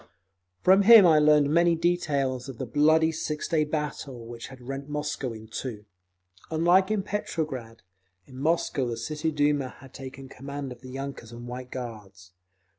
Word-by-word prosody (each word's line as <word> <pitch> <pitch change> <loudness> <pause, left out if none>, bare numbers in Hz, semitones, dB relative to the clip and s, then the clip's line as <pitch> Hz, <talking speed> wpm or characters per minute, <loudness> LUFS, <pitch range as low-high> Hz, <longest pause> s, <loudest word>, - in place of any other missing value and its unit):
From 190 +2 +6
him 215 -1 +9
I 160 -3 +6
learned 150 -1 +4
many 170 0 +4
details 140 -7 0
of 130 - -8
the 130 - -4
bloody 155 +5 +3
six 150 -1 -3
day 160 -2 +2
battle 150 -5 -4
which 115 0 -8
had 130 0 -12
rent 135 +3 -7
Moscow 150 -3 -3
in 110 -1 -10
two. 110 -2 -6 0.6
Unlike 175 +4 +3
in 215 -2 0
Petrograd, 150 - -4 0.4
in 130 0 -12
Moscow 150 -3 0
the 115 -1 -3
City 150 +7 -2
Duma 145 -3 +1
had 135 -1 -15
taken 135 0 -9
command 140 0 -7
of 125 - -10
the 130 - -10
yunkers 135 -3 -7
and 120 +1 -9
White 125 +1 -7
Guards. 105 -7 -8
140 Hz, 165 wpm, -27 LUFS, 125-155 Hz, 0.6 s, him